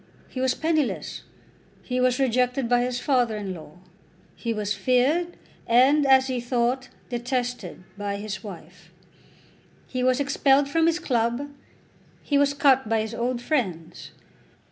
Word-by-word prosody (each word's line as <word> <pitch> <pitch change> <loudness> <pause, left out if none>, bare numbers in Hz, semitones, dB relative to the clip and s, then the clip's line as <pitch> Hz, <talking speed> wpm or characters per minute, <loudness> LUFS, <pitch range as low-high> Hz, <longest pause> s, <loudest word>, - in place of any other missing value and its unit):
He 255 - -5
was 260 -1 +1
penniless. 315 -4 -1 0.6
He 250 0 -2
was 250 0 +2
rejected 250 0 +1
by 245 0 +3
his 245 0 -1
father 245 -5 +1
in 200 -3 -4
law. 155 -3 -11 0.6
He 230 - -3
was 210 -2 -1
feared, 260 - +1 0.3
and, 270 +5 +4
as 265 -1 +6
he 255 -2 -2
thought, 245 +1 -1 0.2
detested 245 -6 -3 0.2
by 200 -1 -2
his 210 +2 -6
wife. 175 -3 -11 1.0
He 255 - -4
was 255 +1 +2
expelled 280 0 +3
from 325 +3 +2
his 335 0 +2
club. 245 -2 -1 0.7
He 285 -1 +1
was 285 0 +2
cut 265 -5 +3
by 225 -1 +2
his 220 +1 -5
old 240 +1 -2
friends. 180 - -2
250 Hz, 145 wpm, -25 LUFS, 225-270 Hz, 1.0 s, as